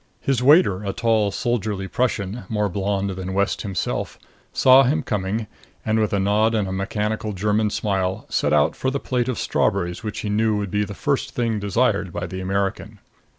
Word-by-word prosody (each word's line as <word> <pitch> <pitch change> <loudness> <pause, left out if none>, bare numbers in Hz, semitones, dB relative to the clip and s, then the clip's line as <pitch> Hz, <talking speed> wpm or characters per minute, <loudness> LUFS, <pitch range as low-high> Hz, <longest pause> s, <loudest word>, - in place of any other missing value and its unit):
His 135 -3 0
waiter 130 - +5
a 100 -1 -2
tall 115 -3 +2
soldierly 100 -2 -2
Prussian, 115 -2 -2
more 105 -2 0
blond 100 +1 -1
than 95 0 -5
West 100 +1 0
himself 95 -4 -3 0.3
saw 130 +1 +6
him 145 +4 +1
coming 105 0 -2 0.4
and, 110 0 +1
with 110 -1 +1
a 100 - +1
nod 105 +3 +2
and 105 -3 0
a - - -4
mechanical 105 +2 -2
German 105 +2 +1
smile, 95 -3 -1
set - - 0
out 75 -1 +3
for 130 - -1
the 140 +1 -2
plate 125 -2 -1
of 125 - -2
strawberries 90 -2 0
which 105 -2 -4
he 105 - -3
knew 110 +1 +1
would 100 -2 -3
be 105 0 +1
the 105 0 -6
first 140 +5 -1
thing 115 -3 0
desired 100 -2 0
by 85 +2 -4
the 95 +2 -6
American. 100 +2 -2
105 Hz, 190 wpm, -22 LUFS, 95-115 Hz, 0.4 s, saw